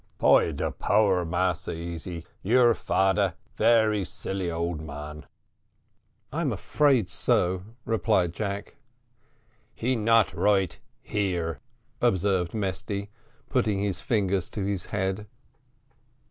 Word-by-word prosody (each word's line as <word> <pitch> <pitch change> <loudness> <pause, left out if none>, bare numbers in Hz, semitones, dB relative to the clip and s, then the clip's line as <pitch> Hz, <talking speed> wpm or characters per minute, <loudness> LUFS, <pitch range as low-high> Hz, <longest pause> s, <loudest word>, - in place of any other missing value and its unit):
"By - - +5
de 70 - -2
power, 100 -4 +2
Massa 90 +1 -1
Easy, 85 0 -6 0.2
your 120 +3 +5
fader 95 -3 +1 0.2
very 110 -2 +3
silly 95 0 -4
old 85 -1 -2
man." 75 0 -8 1.1
"I'm - - 0
afraid 135 -9 +2
so," 90 +1 +1 0.2
replied 105 -6 +1
Jack. 100 +5 -4 1.0
"He 130 +3 0
not 115 -1 +3
right 95 -4 +1 0.2
here," 85 -7 -1 0.4
observed 95 0 +1
Mesty, 100 0 -3 0.4
putting 105 -2 +1
his 100 -2 -1
fingers 100 -3 0
to 105 - -4
his 100 -3 -2
head. 100 +1 -2
95 Hz, 105 wpm, -27 LUFS, 85-105 Hz, 1.1 s, By